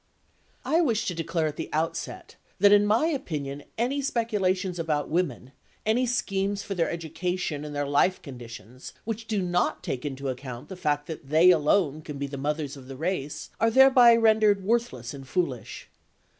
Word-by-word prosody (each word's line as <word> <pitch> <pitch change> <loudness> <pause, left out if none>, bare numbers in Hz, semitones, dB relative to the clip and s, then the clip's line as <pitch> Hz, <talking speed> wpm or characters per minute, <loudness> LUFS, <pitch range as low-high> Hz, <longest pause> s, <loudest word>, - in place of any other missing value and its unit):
I 330 +2 +3
wish 230 -10 +1
to 180 - -1
declare 165 0 -1
at 150 - -3
the - - -5
outset 165 +2 -3 0.2
that 200 +1 +6
in 205 0 +6
my 220 +8 +3
opinion 150 - -3 0.2
any 255 +5 0
speculations 195 - 0
about 150 -3 -1
women, 145 -7 -1 0.3
any 240 +4 +2
schemes 200 -4 -1
for 200 - -4
their 170 -3 0
education 170 -1 -3
and 150 -1 -7
their 145 0 -1
life 145 +6 +2
conditions 120 - -10
which 225 0 -4
do 210 -4 0
not 175 0 0
take 125 - -3
into 140 -1 -4
account 125 -1 -7
the 190 - -6
fact 150 -4 -1
that 150 -4 -8
they 165 +4 +6
alone 155 -1 +2
can 150 -2 -7
be 140 - -2
the 140 0 -6
mothers 150 0 -2
of 130 -2 -12
the 135 -1 -8
race, 160 -2 -3
are 225 - +4
thereby 255 -1 +7
rendered 215 -3 +4
worthless 190 - -1
and 135 -1 -10
foolish. 135 -8 -3
170 Hz, 175 wpm, -26 LUFS, 145-205 Hz, 0.3 s, thereby